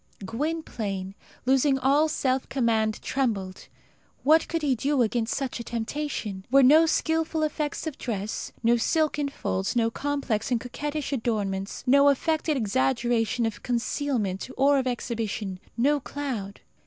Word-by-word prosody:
Gwynplaine, 225 -7 -3 0.3
losing 270 +1 +3
all 285 +4 +3
self 260 -3 0
command, 225 -4 +1
trembled. 205 -9 -2 0.6
What 315 +3 +5
could 330 -1 -2
he 280 -3 +3
do 265 +2 +1
against 225 0 0
such 270 -3 -3
a - - -4
temptation? 235 -2 -3
Here 190 - -14
were 270 +2 +6
no 310 +5 +7
skilful 320 0 0
effects 300 0 -2
of 315 -4 -5
dress, 215 -3 -4
no 235 +1 +4
silken 295 +3 +1
folds, 195 -6 -2
no 230 -1 +2
complex 275 -6 -2
and 245 -2 +1
coquettish 290 +4 -4
adornments, 205 -6 -2
no 280 +2 +6
affected 310 +1 +1
exaggeration 225 - +1
of 225 -2 -3
concealment 240 -5 -1
or 275 +1 +4
of 260 - -1
exhibition, 220 -6 -3 0.2
no 285 +5 +3
cloud. 250 -9 -5
255 Hz, 140 wpm, -26 LUFS, 220-285 Hz, 0.6 s, no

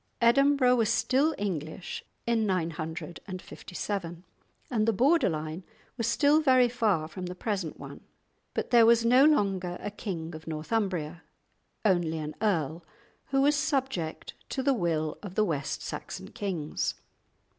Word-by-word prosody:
Edinburgh 255 +1 +4
was 225 -2 +2
still 285 +5 +2
English 175 -3 -4 0.2
in 230 -2 +1
957, 175 +1 -4 0.5
and 220 -3 +1
the 225 - +4
border 270 - +4
line 155 +2 -4 0.3
was 230 -3 -1
still 290 +6 +4
very 255 -4 +5
far 210 -10 +1
from 180 +3 -6
the 180 - -6
present 190 -5 -3
one. - - -9 0.5
But - - -2
there 235 -2 +7
was 230 0 +5
no 250 +4 +6
longer 195 - +2
a 205 - -5
king 175 -5 -5
of 155 +1 -10
Northumbria; 170 0 -2 0.6
only 175 -5 +2
an 155 -1 -4
earl, 165 -6 0 0.4
who 270 0 +2
was 290 +2 +4
subject 265 - -2 0.2
to 265 - -2
the 275 0 +3
will 165 -8 -1
of 195 -3 -8
the 215 - +3
West 145 -5 -2
Saxon - - -6
kings. 175 -7 -2
195 Hz, 140 wpm, -28 LUFS, 165-240 Hz, 0.6 s, there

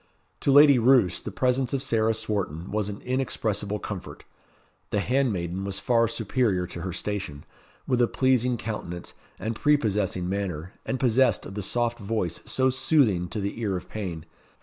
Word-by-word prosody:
To 140 - +2
Lady 145 -2 +8
Roos, 120 -7 +4
the - - -5
presence 130 0 0
of 135 - -2
Sarah 115 -3 +1
Swarton 100 -7 -3
was 105 -1 -1
an 100 - -7
inexpressible 110 -5 -1
comfort. 100 -2 -7 0.7
The 105 - 0
handmaiden 100 -8 0
was 100 0 -3
far 115 -1 +2
superior 110 -4 0
to 85 - -8
her 95 +1 -3
station, 95 -7 -4 0.4
with 125 -2 +1
a 120 - +4
pleasing 125 -1 +2
countenance, 90 -6 -5 0.2
and 110 +1 -3
prepossessing 105 -11 +1
manner, 95 -3 -3
and 130 - -1
possessed 130 +1 +3
of - - -8
the 105 - -4
soft 120 +4 -1
voice 100 -5 -2
so 130 0 +1
soothing 125 - +2
to 105 - -4
the 100 +3 -3
ear 100 -4 0
of 90 - -10
pain. 90 -7 -5
110 Hz, 165 wpm, -26 LUFS, 95-125 Hz, 0.7 s, Lady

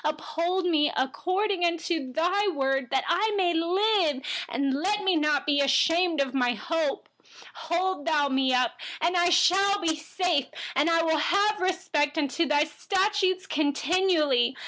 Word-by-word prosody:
116Uphold 320 +4 -2
me 310 -4 +2
according 355 +5 -1
to 340 +1 -3
your 340 +7 -1
word, 270 -1 -1
that 265 - +1
I 415 +5 +1
may 355 -3 +1
live. 340 -4 +1 0.5
Let 400 +9 -1
me 380 -3 +2
not 300 -2 0
be 285 -1 +2
ashamed 325 +4 +2
of 270 -1 -2
my 245 -2 +1
hope. 305 +5 -3 0.6
117Hold 330 -5 0
me 265 0 +1
up, 250 0 +2 0.3
and 340 +3 +1
I 350 0 +3 0.2
will 400 +2 +2
be 320 -3 0
safe, 315 -2 -1 0.3
and 290 +4 +2
will 330 -1 +2
have 405 +6 +1
respect 360 -6 -1
for 315 - 0 0.2
your 295 -2 +2
statutes 385 -1 0
continually. 295 -4 +1
330 Hz, 140 wpm, -26 LUFS, 290-370 Hz, 0.6 s, I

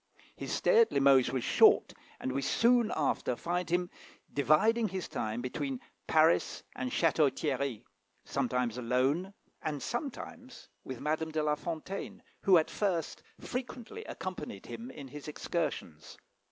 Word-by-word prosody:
His - - -6
stay 460 - +4
at 455 - +3
Limoges 135 -2 +5
was 130 -3 -1
short, - - +5 0.3
and 130 - -2
we 135 +2 -1
soon 235 - +3
after 140 -4 0
find 175 +5 -2
him 175 +1 0 0.4
dividing 215 - +3
his 190 -2 -4
time 110 +3 -3
between 135 0 -3 0.3
Paris 160 +1 +3
and 130 - -2
Château 160 -3 +3
Thierry, 135 -5 -2 0.4
sometimes 125 -3 -1
alone, 130 +10 +1 0.3
and 150 -2 -2
sometimes 250 - -6
with 130 -2 -6
Madame 160 +1 -1
de 155 -1 -1
La 150 0 +2
Fontaine, 165 +5 -5 0.2
who 190 -2 +6
at 160 - +1
first 180 -6 -1 0.2
frequently 255 - -6
accompanied - - -6
him 235 +2 -7
in 140 - -9
his 145 +2 -9
excursions. 150 - -4
155 Hz, 140 wpm, -31 LUFS, 135-190 Hz, 0.4 s, who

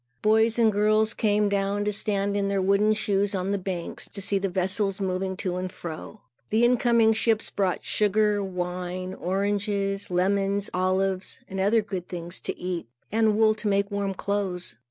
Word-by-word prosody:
Boys 220 +2 +4
and 225 -2 +4
girls 215 +2 +2
came 210 -1 +2
down 200 +1 0
to 210 - 0
stand 200 0 0
in 200 -1 0
their 200 0 0
wooden 200 +3 +3
shoes 205 -1 +1
on 190 +1 -1
the 200 - +1
banks, 180 -2 -5
to 200 - -5
see 200 0 +1
the 195 0 -1
vessels 190 +2 0
moving 190 0 -2
to 185 -2 -2
and 185 0 -4
fro. 170 +6 -8 0.3
The 225 +3 +3
incoming 235 -2 +4
ships 220 0 +1
brought 190 -3 -1
sugar, 210 0 +2
wine, 180 0 -4
oranges, 200 +1 -1
lemons, 195 +2 0
olives 185 +1 0
and 195 - -5
other 210 +3 +3
good 190 -4 -5
things 175 0 -5
to - - -4
eat, 180 -6 -4 0.2
and 220 -1 +2
wool 220 -1 +5
to 215 0 -5
make 200 0 +1
warm 200 -1 -2
clothes. 185 - -2
200 Hz, 175 wpm, -26 LUFS, 185-210 Hz, 0.3 s, wool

